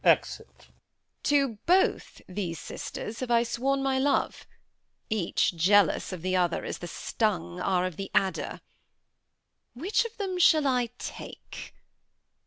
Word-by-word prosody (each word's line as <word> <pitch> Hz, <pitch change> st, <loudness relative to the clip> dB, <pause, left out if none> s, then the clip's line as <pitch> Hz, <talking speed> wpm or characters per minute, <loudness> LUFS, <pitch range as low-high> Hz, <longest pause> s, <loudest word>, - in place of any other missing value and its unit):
Exit. -, -, +1 dB
Edm. -, -, -22 dB, 0.5 s
To 285 Hz, -1 st, +4 dB, 0.2 s
both 370 Hz, +2 st, +2 dB
these 180 Hz, -3 st, -4 dB
sisters 220 Hz, +2 st, -6 dB
have 255 Hz, -, -4 dB
I 235 Hz, -1 st, +4 dB
sworn 270 Hz, +4 st, 0 dB
my 265 Hz, -1 st, +1 dB
love; 280 Hz, +1 st, 0 dB, 0.6 s
Each 190 Hz, -3 st, +1 dB
jealous 190 Hz, +2 st, +3 dB
of 180 Hz, -3 st, -6 dB
the 185 Hz, 0 st, 0 dB
other, 175 Hz, -2 st, +1 dB
as -, -, -4 dB
the 175 Hz, -, -6 dB
stung 175 Hz, -2 st, -2 dB
Are 180 Hz, -1 st, +1 dB
of 185 Hz, -4 st, -4 dB
the 195 Hz, -, -5 dB
adder. 190 Hz, -1 st, 0 dB, 1.1 s
Which 355 Hz, -, +1 dB
of 465 Hz, -1 st, -8 dB
them 380 Hz, -4 st, -2 dB
shall 315 Hz, -4 st, +5 dB
I 250 Hz, -3 st, +2 dB
take? -, -, -9 dB
220 Hz, 140 wpm, -28 LUFS, 185-275 Hz, 1.1 s, shall